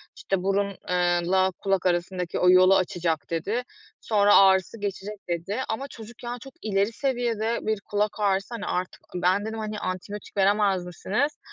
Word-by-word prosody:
işte, 190 Hz, -2 st, -2 dB
"burun 200 Hz, +1 st, +1 dB, 0.2 s
eee 175 Hz, -1 st, +2 dB
la 190 Hz, 0 st, +3 dB
kulak 195 Hz, -2 st, 0 dB
arasındaki 180 Hz, 0 st, -1 dB
o 180 Hz, -, +5 dB
yolu 185 Hz, +1 st, +7 dB
açacak." 170 Hz, -4 st, -1 dB
dedi. 200 Hz, +9 st, -1 dB, 0.4 s
"Sonra 205 Hz, -2 st, +4 dB
ağrısı 190 Hz, +2 st, +5 dB
geçecek." 205 Hz, +1 st, -4 dB
dedi. 175 Hz, +7 st, -2 dB
Ama 265 Hz, +6 st, -3 dB
çocuk, 235 Hz, -1 st, -12 dB
yani, 240 Hz, 0 st, -4 dB
çok 270 Hz, +3 st, -12 dB
ileri 200 Hz, 0 st, +1 dB
seviyede 235 Hz, -4 st, -1 dB
bir 215 Hz, -2 st, -1 dB
kulak 210 Hz, +1 st, -1 dB
ağrısı, 200 Hz, +3 st, 0 dB
hani, 205 Hz, -, -5 dB
artık 180 Hz, +1 st, -3 dB
ben 185 Hz, +4 st, +2 dB
dedim, 220 Hz, 0 st, -4 dB
hani, 215 Hz, -1 st, -4 dB
"Antibiyotik 200 Hz, +3 st, -6 dB
veremez 195 Hz, -2 st, +3 dB
misiniz?" 230 Hz, +11 st, -2 dB
200 Hz, 160 wpm, -26 LUFS, 185-220 Hz, 0.4 s, yolu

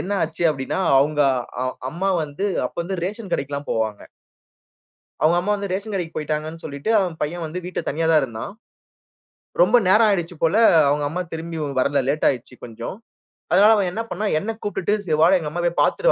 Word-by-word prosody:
என்ன 200 Hz, -, -3 dB
ஆச்சு 165 Hz, +2 st, -4 dB
அப்டின்னா, 135 Hz, +5 st, -3 dB, 0.2 s
அவங்க 150 Hz, +2 st, +2 dB, 0.4 s
அ -, -, -1 dB, 0.3 s
அம்மா 190 Hz, +4 st, -1 dB
வந்து 150 Hz, +8 st, -4 dB, 0.2 s
அப்ப -, -, -12 dB
வந்து 190 Hz, 0 st, -4 dB
ரேஷன் 200 Hz, -1 st, -5 dB
கடைக்குலாம் 140 Hz, +1 st, -4 dB
போவாங்க. 110 Hz, -2 st, -2 dB, 1.2 s
அவங்க 165 Hz, +3 st, +4 dB
அம்மா 205 Hz, +4 st, -1 dB
வந்து 200 Hz, -1 st, -5 dB
ரேஷன் 200 Hz, +3 st, -3 dB
கடைக்கு 175 Hz, -4 st, -3 dB
போய்ட்டாங்கன்னு 155 Hz, +2 st, -4 dB
சொல்லிட்டு, 140 Hz, +6 st, -5 dB
அவன் 180 Hz, -4 st, -1 dB
பையன் 170 Hz, +3 st, -2 dB
வந்து 165 Hz, +4 st, -5 dB
வீட்டில 180 Hz, -, -3 dB
தனியா 160 Hz, +3 st, -1 dB
தான் 155 Hz, -2 st, +5 dB
இருந்தான். 115 Hz, -, -6 dB, 1.1 s
ரொம்ப 245 Hz, -, +5 dB
நேரம் 220 Hz, +3 st, +6 dB
ஆயிடுச்சு 175 Hz, -3 st, -1 dB
போல 165 Hz, +5 st, +3 dB, 0.3 s
அவங்க 145 Hz, 0 st, +1 dB
அம்மா 180 Hz, +4 st, -3 dB
திரும்பி 165 Hz, 0 st, -5 dB, 0.2 s
வரல. 140 Hz, +2 st, +2 dB
லேட் 150 Hz, +2 st, +1 dB
ஆயிடுச்சு 125 Hz, -1 st, -4 dB
கொஞ்சம். 115 Hz, -, -7 dB, 0.6 s
அதனால 210 Hz, +3 st, +6 dB
அவன் 195 Hz, -4 st, +1 dB
என்ன 220 Hz, +4 st, -3 dB
பண்னான், 210 Hz, -3 st, -1 dB
என்னை 225 Hz, +5 st, -3 dB
கூப்ட்டுட்டு 205 Hz, -1 st, -1 dB
சரி 155 Hz, -3 st, +1 dB
வாடா 180 Hz, +3 st, +6 dB
எங்க 150 Hz, -2 st, -5 dB
அம்மா 175 Hz, +1 st, -3 dB
போய் 170 Hz, -, 0 dB
பார்த்துட்டு -, -, +3 dB
165 Hz, 180 wpm, -22 LUFS, 150-195 Hz, 1.2 s, நேரம்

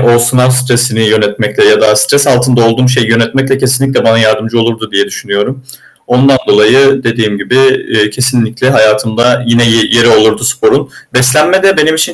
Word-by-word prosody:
o -, -, +2 dB
sınav 125 Hz, +2 st, +1 dB
stresini 125 Hz, -3 st, 0 dB
yönetmekle 110 Hz, -, -1 dB
ya 435 Hz, +2 st, +3 dB
da -, -, +2 dB
stres 145 Hz, -, +1 dB
altında 125 Hz, -2 st, +1 dB
olduğum 115 Hz, +3 st, 0 dB
şeyi 125 Hz, -3 st, 0 dB
yönetmekle 135 Hz, +4 st, -1 dB
kesinlikle 135 Hz, +1 st, -1 dB
bana 115 Hz, 0 st, +2 dB
yardımcı 110 Hz, +1 st, -1 dB
olurdu 115 Hz, -1 st, -4 dB
diye 100 Hz, 0 st, 0 dB
düşünüyorum. 130 Hz, +7 st, -5 dB, 0.4 s
Ondan 130 Hz, +2 st, +2 dB
dolayı 130 Hz, +6 st, +2 dB
dediğim 115 Hz, -3 st, -2 dB
gibi, 100 Hz, +5 st, -4 dB, 0.3 s
eee, 105 Hz, -1 st, 0 dB
kesinlikle 125 Hz, +1 st, -2 dB
hayatımda 110 Hz, +1 st, 0 dB
yine 120 Hz, 0 st, +1 dB
ye 115 Hz, -1 st, +2 dB
yeri 115 Hz, 0 st, +2 dB
olurdu 110 Hz, -1 st, +2 dB
sporun. -, -, 0 dB, 0.2 s
Beslenme 150 Hz, +10 st, +1 dB
de 195 Hz, 0 st, +2 dB
benim 155 Hz, +1 st, +1 dB
için 165 Hz, +2 st, -2 dB
120 Hz, 165 wpm, -9 LUFS, 110-135 Hz, 0.4 s, ya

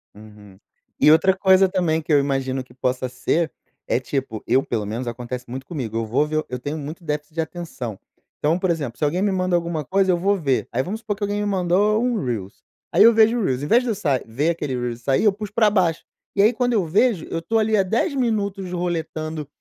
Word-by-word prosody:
Uhum. 105 Hz, -2 st, -15 dB, 0.4 s
E 150 Hz, -, +6 dB
outra 175 Hz, +4 st, +5 dB
coisa 190 Hz, 0 st, +5 dB
também 175 Hz, -4 st, 0 dB
que 160 Hz, -, -5 dB
eu 145 Hz, -, +6 dB
imagino 135 Hz, -2 st, -1 dB
que 125 Hz, -, -20 dB
possa 130 Hz, 0 st, -1 dB
ser 155 Hz, +6 st, 0 dB, 0.4 s
é, -, -, +1 dB
tipo 130 Hz, -4 st, -4 dB
eu 130 Hz, +3 st, +3 dB
pelo 110 Hz, -3 st, -2 dB
menos 115 Hz, +4 st, -4 dB
acontece 125 Hz, +1 st, -5 dB
muito 130 Hz, +2 st, -6 dB
comigo 125 Hz, -, -4 dB
eu 115 Hz, -, -1 dB
vou 125 Hz, +7 st, +1 dB
ver 155 Hz, 0 st, -1 dB
eu 125 Hz, 0 st, -4 dB
tenho 145 Hz, +5 st, -4 dB
muito 155 Hz, +4 st, -7 dB
déficit 150 Hz, 0 st, -4 dB
de 165 Hz, -, +1 dB
atenção. 160 Hz, -, -6 dB, 0.4 s
Então, 155 Hz, +3 st, +1 dB
por 185 Hz, -1 st, 0 dB
exemplo, 140 Hz, -8 st, -3 dB
se -, -, -4 dB
alguém 175 Hz, +5 st, 0 dB
me 200 Hz, 0 st, +2 dB
manda 185 Hz, -1 st, 0 dB
alguma 170 Hz, -3 st, -2 dB
coisa, 195 Hz, -1 st, +2 dB
eu 175 Hz, -, +2 dB
vou 200 Hz, +4 st, +2 dB
ver. 140 Hz, -9 st, 0 dB
Aí, 125 Hz, -, 0 dB
vamos 205 Hz, +9 st, -4 dB
supor 215 Hz, -2 st, -3 dB
que 205 Hz, -, -22 dB
alguém 205 Hz, 0 st, -1 dB
me -, -, -1 dB
mandou 200 Hz, +3 st, +2 dB
um 240 Hz, -5 st, 0 dB
reel, 105 Hz, -6 st, -5 dB, 0.3 s
aí 190 Hz, -, +6 dB
eu 230 Hz, +1 st, +8 dB
vejo 225 Hz, +2 st, +4 dB
o -, -, 0 dB
reel. 130 Hz, -4 st, 0 dB
Invés 230 Hz, -, +3 dB
de 250 Hz, -, -3 dB
eu 220 Hz, -, 0 dB
sa 145 Hz, -8 st, 0 dB
ver 135 Hz, +8 st, -1 dB
aquele 150 Hz, -5 st, -2 dB, 0.2 s
e -, -, -10 dB
sair, 135 Hz, +3 st, 0 dB
eu 210 Hz, -, +6 dB
puxo 210 Hz, +1 st, -7 dB
pra 220 Hz, -1 st, +4 dB
baixo. 180 Hz, -6 st, +1 dB, 0.3 s
E 200 Hz, -, +4 dB
aí, 215 Hz, +3 st, +6 dB
quando 245 Hz, 0 st, 0 dB
eu 210 Hz, -4 st, +2 dB
vejo, 200 Hz, 0 st, +2 dB
eu 165 Hz, -, -3 dB
estou 225 Hz, +7 st, 0 dB
ali 215 Hz, 0 st, +2 dB
há 195 Hz, -, +4 dB
10 225 Hz, -, 0 dB
minutos 200 Hz, -7 st, -1 dB
roletando 160 Hz, -3 st, -3 dB
165 Hz, 240 wpm, -22 LUFS, 130-200 Hz, 0.4 s, eu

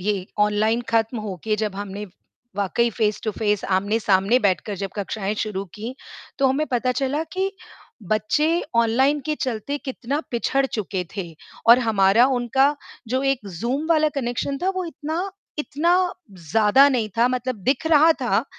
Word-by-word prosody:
ये 195 Hz, -1 st, -1 dB
ऑनलाइन 210 Hz, +3 st, +2 dB
ख़त्म 225 Hz, +1 st, +1 dB
होके 210 Hz, +1 st, -3 dB
जब 210 Hz, -2 st, -2 dB
हमने, 205 Hz, 0 st, -5 dB, 0.5 s
वाक़ई 205 Hz, +4 st, +1 dB
फ़ेस 210 Hz, -2 st, 0 dB
टू 215 Hz, -, 0 dB
फ़ेस, 210 Hz, -1 st, -1 dB
आमने-सामने 200 Hz, +2 st, +2 dB
बैठकर 200 Hz, -1 st, 0 dB
जब 195 Hz, 0 st, -4 dB
कक्षाएँ 205 Hz, 0 st, -3 dB
शुरू 200 Hz, -2 st, -4 dB
की, 230 Hz, +5 st, -6 dB, 0.4 s
तो 270 Hz, -, +4 dB
हमें 275 Hz, +4 st, +1 dB
पता 250 Hz, +1 st, +1 dB
चला 275 Hz, +4 st, -1 dB
कि, 380 Hz, +1 st, -1 dB, 0.5 s
बच्चे 300 Hz, -, +1 dB
ऑनलाइन 260 Hz, +6 st, +3 dB
के 305 Hz, -, 0 dB
चलते 255 Hz, +1 st, -2 dB
कितना 270 Hz, +2 st, -3 dB
पिछड़ 270 Hz, +3 st, +1 dB
चुके 195 Hz, -6 st, -3 dB
थे 175 Hz, -4 st, -5 dB, 0.4 s
और 235 Hz, +2 st, +9 dB
हमारा 220 Hz, 0 st, +4 dB
उनका 265 Hz, +4 st, +2 dB, 0.3 s
जो 260 Hz, +3 st, 0 dB
एक 270 Hz, -5 st, 0 dB
ज़ूम 265 Hz, +6 st, -1 dB
वाला 310 Hz, -2 st, +4 dB
कनेक्शन 275 Hz, +1 st, -2 dB
था 375 Hz, -, +1 dB
वो 370 Hz, -1 st, -2 dB
इतना 330 Hz, +4 st, -4 dB, 0.3 s
इतना 300 Hz, +3 st, +1 dB, 0.6 s
ज़्यादा 225 Hz, +6 st, +6 dB
नहीं 240 Hz, -5 st, 0 dB
था 240 Hz, +2 st, +5 dB
मतलब 255 Hz, -1 st, -2 dB
दिख 265 Hz, +6 st, +1 dB
रहा 320 Hz, 0 st, +6 dB
था, 240 Hz, -5 st, 0 dB
235 Hz, 155 wpm, -23 LUFS, 210-275 Hz, 0.6 s, और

